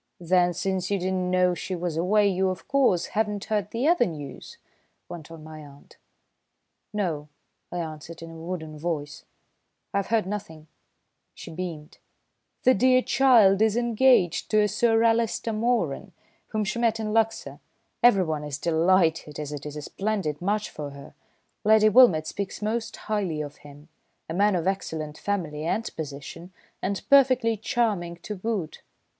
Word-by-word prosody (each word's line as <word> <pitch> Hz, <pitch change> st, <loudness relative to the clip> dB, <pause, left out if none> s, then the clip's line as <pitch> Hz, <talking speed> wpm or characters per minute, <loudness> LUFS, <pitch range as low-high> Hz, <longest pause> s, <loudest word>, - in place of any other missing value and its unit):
"Then, 180 Hz, 0 st, +2 dB
since 185 Hz, 0 st, -2 dB
you 200 Hz, -, +1 dB
did 185 Hz, 0 st, -2 dB
not 185 Hz, -1 st, -1 dB
know 180 Hz, 0 st, +3 dB
she 185 Hz, +1 st, -4 dB
was 175 Hz, -2 st, -3 dB
away, 200 Hz, +5 st, +3 dB
you, 190 Hz, 0 st, +1 dB
of 185 Hz, -, -6 dB
course, 255 Hz, -11 st, +2 dB
have 220 Hz, +1 st, +2 dB
not 205 Hz, -1 st, -4 dB
heard 210 Hz, -2 st, -1 dB
the 240 Hz, +6 st, -1 dB
other 340 Hz, -8 st, +4 dB
news?" 160 Hz, -, -8 dB, 0.5 s
went 165 Hz, -3 st, -9 dB
on 165 Hz, -2 st, -11 dB
my 155 Hz, 0 st, -10 dB
aunt. 140 Hz, -1 st, -16 dB, 0.9 s
"No," 170 Hz, -8 st, -2 dB, 0.4 s
I 175 Hz, -, -4 dB
answered 165 Hz, 0 st, -7 dB
in 165 Hz, -, -9 dB
a -, -, -11 dB
wooden 160 Hz, -2 st, -6 dB
voice. 150 Hz, -3 st, -4 dB, 0.7 s
"I've 200 Hz, -1 st, 0 dB
heard 225 Hz, -3 st, +1 dB
nothing." 175 Hz, -6 st, -6 dB, 0.7 s
She -, -, -10 dB
beamed. 160 Hz, -3 st, -7 dB, 0.6 s
"The 255 Hz, -, +6 dB
dear 255 Hz, +3 st, +4 dB
child 225 Hz, -7 st, +5 dB
is 220 Hz, 0 st, +3 dB
engaged 240 Hz, -6 st, +3 dB
to 215 Hz, -1 st, +4 dB
a 210 Hz, -, +3 dB
Sir 225 Hz, +2 st, +2 dB
Alister 230 Hz, 0 st, +1 dB
Moeran, 215 Hz, -, -1 dB, 0.3 s
whom 215 Hz, -1 st, -2 dB
she 215 Hz, +4 st, -3 dB
met 225 Hz, -1 st, +1 dB
in 215 Hz, -1 st, -3 dB
Luxor. 225 Hz, 0 st, 0 dB, 0.4 s
Everyone 180 Hz, -10 st, +3 dB
is 145 Hz, -2 st, -4 dB
delighted, 165 Hz, -2 st, +1 dB
as 150 Hz, -1 st, -5 dB
it 150 Hz, 0 st, -6 dB
is 150 Hz, -, -7 dB
a 150 Hz, -, -6 dB
splendid 190 Hz, -6 st, -3 dB
match 210 Hz, +3 st, -1 dB
for 150 Hz, -2 st, -6 dB
her. 140 Hz, 0 st, -12 dB, 0.5 s
Lady 215 Hz, 0 st, +5 dB
Wilmott 210 Hz, -9 st, +6 dB
speaks 200 Hz, +3 st, -5 dB
most 225 Hz, +2 st, -2 dB
highly 200 Hz, -8 st, -2 dB
of 145 Hz, -1 st, -6 dB
him, 145 Hz, +1 st, -15 dB, 0.4 s
a 160 Hz, -, -5 dB
man 200 Hz, +2 st, +3 dB
of 170 Hz, -1 st, -1 dB
excellent 160 Hz, -6 st, -3 dB
family 165 Hz, -7 st, -3 dB
and 215 Hz, +7 st, -1 dB
position, 155 Hz, +4 st, -7 dB, 0.3 s
and 195 Hz, +1 st, -3 dB
perfectly 255 Hz, -5 st, +5 dB
charming 215 Hz, -7 st, -1 dB
to 210 Hz, -, -5 dB
boot." 200 Hz, -4 st, -4 dB
185 Hz, 160 wpm, -26 LUFS, 160-220 Hz, 0.9 s, The